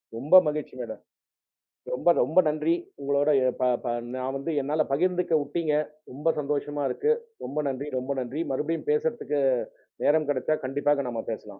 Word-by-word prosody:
ரொம்ப 145 +10 +3
மகிழ்ச்சி 150 -2 -3
மேடம். 110 -2 -7 0.9
ரொம்ப, 125 - 0 0.2
ரொம்ப 160 +8 +1
நன்றி. 155 +2 +1 0.3
உங்களோட 140 +1 +1 0.2
எ - - +3
தா 125 - +3 0.2
தா 120 - 0 0.2
நான் 130 +1 -3
வந்து 140 +4 -3
என்னால 150 +3 +1
பகிர்ந்துக்க 180 +2 +1
உட்டீங்க. 160 -2 -1 0.4
ரொம்ப 145 +5 -2
சந்தோஷமா 145 0 -2
இருக்கு. 450 - +2 0.3
ரொம்ப 145 - -4
நன்றி 135 +2 -3
ரொம்ப 130 +2 -2
நன்றி. 130 +6 -3
மறுபடியும் 160 - -2
பேசறதுக்கு 450 - 0 0.6
நேரம் 155 0 +3
கிடைச்ச 135 +2 -1 0.2
கண்டிப்பா 145 +2 +1
நாம 115 -1 -4
பேசலாம். 110 - -5
145 Hz, 150 wpm, -27 LUFS, 135-160 Hz, 0.9 s, ரொம்ப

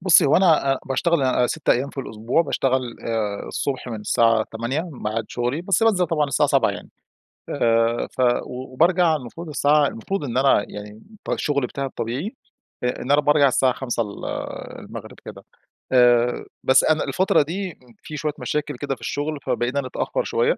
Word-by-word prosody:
بصّي 180 -5 +6
هو 140 - +4
أنا 160 -7 +4
آآ 135 - -2
باشتغل 165 +4 +1
آآ 130 -1 +2
6 155 +4 -5
أيام 135 +3 +3
في 140 - -5
الأسبوع، 115 +6 0
باشتغل 130 -5 -1
آآ 110 -3 -2
الصبح 135 -2 -3
من 110 -3 -5
الساعة 115 +1 +3
8:00 130 +10 -2
ميعاد 115 -2 -3
شغلي، 125 +6 -2
بس 190 +2 +1
بانزل 195 -6 +3
طبعًا 155 -2 +1
الساعة 135 - +2
7:00 - - +3
يعني، - - -9 0.6
آآ 115 0 +1
ف - - -4 0.2
وبارجع 160 +7 +1
المفروض 150 +5 -7
الساعة 145 0 +3
المفروض 170 - -4
إن 125 -3 -3
أنا 130 -6 +4
يعني 105 0 -8 0.2
الط 215 - -12
الشغل 140 -4 0
بتاعي 140 0 -4
الطبيعي 135 - -4 0.5
إ - - +2
إن 130 - -2
أنا 145 +1 +5
بارجع 145 -1 +4
الساعة 130 0 +2
17:00 120 -2 -2
ال 105 -2 -8 0.5
المغرب - - -9
كده، - - -10 0.5
آآ 120 -1 +4 0.2
بس 130 - +5
أنا 155 0 +2
الفترة 155 +7 +2
دي 180 +6 -3
امم 125 -6 -20
في 155 - -7
شوية 150 0 -2
مشاكل 150 -1 -2
كده 135 0 -3
في - - -24
الشغل 145 +1 -3
فبقينا 125 +2 -1
نتأخر 140 - -2
شوية 470 +1 +1
135 Hz, 180 wpm, -22 LUFS, 120-155 Hz, 0.6 s, بصّي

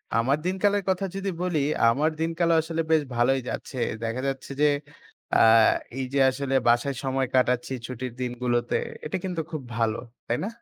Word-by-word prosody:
আমার 130 +5 +2
দিনকালের 200 +2 +1
কথা 190 +1 +1
যদি 195 0 -2
বলি, 175 -4 0 0.3
আমার 145 +7 +2
দিনকালও 165 +1 +1
আসলে 165 +1 -2
বেশ 160 - +5
ভালোই 130 +3 +3
যাচ্ছে। 130 - -6 0.3
দেখা 115 +2 -2
যাচ্ছে 135 0 -4
যে, - - +6 0.7
আ - - +6 0.6
এই 135 - -1
যে 140 - +2
আসলে 135 +1 -3
বাসায় 120 +3 +3
সময় 135 -1 0
কাটাচ্ছি, 125 0 +2
ছুটির 125 -1 -5
দিনগুলোতে। 120 -1 -1 0.3
এটা 155 - -2
কিন্তু 180 -3 -2
খুব 155 -4 -4
ভালো। 115 -1 +1 0.3
তাই 120 - 0
না? - - -1
135 Hz, 165 wpm, -26 LUFS, 125-165 Hz, 0.7 s, যে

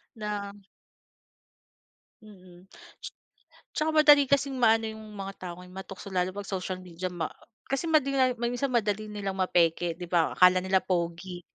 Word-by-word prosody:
Na 210 -2 -4 1.7
mm, 185 -3 -16 1.1
tsaka 310 0 +1
madali 295 -2 +7
kasing 275 -1 +1
maano 225 -2 +4
'yong 220 0 -10
mga 195 0 -6
tao 180 -2 -5
ngayon 180 0 -13
matukso 190 0 -8
lalo 185 0 0
'pag 205 -1 -7
social 185 -1 -4
media 180 0 -5
ma 175 -2 -4 0.4
kasi 275 +5 -1
madinga 275 -4 +3
minsan 245 +3 -1
madali 215 -2 0
nilang 200 -2 -4
mapeke 170 -2 +1
'di 175 - -6
ba 170 -2 +2
akala 180 0 +6
nila 190 0 +3
pogi 175 0 -2
195 Hz, 140 wpm, -28 LUFS, 180-235 Hz, 1.7 s, madali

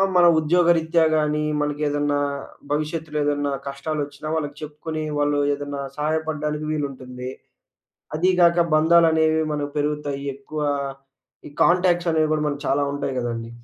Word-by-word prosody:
ఆ! - - +4
మన 175 -1 +7
ఉద్యోగరీత్యా 165 0 +3
గాని, 150 0 +1 0.2
మనకేదన్నా 145 0 0 0.5
భవిష్యత్తులో 150 +1 -2
ఏదన్నా 145 -1 0 0.2
కష్టాలోచ్చిన, 145 +1 -4
వాళ్ళకి 145 -2 -3
చెప్పుకొని 155 +1 -5 0.2
వాళ్ళు 145 0 +1 0.2
ఏదైనా 145 0 -5 0.2
సహాయపడడానికి 155 0 -2
వీలుంటుంది. 130 -4 -4 0.9
అది 180 +4 +3
గాక 170 0 +5
బంధాలనేవి 160 0 +4
మనకు 145 -1 -3
పెరుగుతాయి. 145 -1 -2
ఎక్కువ 150 +3 -7 0.9
ఈ - - -14
కాంటాక్ట్స్ 175 -1 +3
అనేవి 155 -1 +2
గూడా 155 -1 0
మనకి 145 0 -4
చాలా 145 +1 +2
ఉంటాయి 140 -2 -3
గదండీ. 115 -1 -3
150 Hz, 125 wpm, -23 LUFS, 145-160 Hz, 0.9 s, మన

